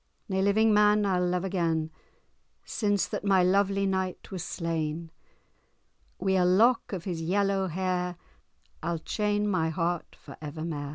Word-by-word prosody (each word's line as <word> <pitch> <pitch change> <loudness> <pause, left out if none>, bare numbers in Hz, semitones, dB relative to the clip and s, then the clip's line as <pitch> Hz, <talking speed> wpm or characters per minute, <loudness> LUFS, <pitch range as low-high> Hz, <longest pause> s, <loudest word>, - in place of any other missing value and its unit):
Nae 190 -2 0
living 215 +2 +4
man 210 0 +4
I'll 180 -2 +1
love 180 0 0
again, 165 -4 -1 0.7
Since 205 -3 0
that - - -4
my 195 -2 +4
lovely 195 +1 +2
knight 190 -1 -2
was 185 -3 -4
slain, 165 -1 -3 1.1
Wi' 190 -1 +1
ae - - +4
lock 220 +7 +3
of 185 -4 -4
his 170 -3 -4
yellow 195 +2 +1
hair, 180 0 -1 0.7
I'll 170 +1 -1
chain 210 +5 -1
my 160 -5 +1
heart 170 +1 -2
for - - -13
evermair. 150 -1 -5
185 Hz, 145 wpm, -28 LUFS, 165-200 Hz, 1.1 s, living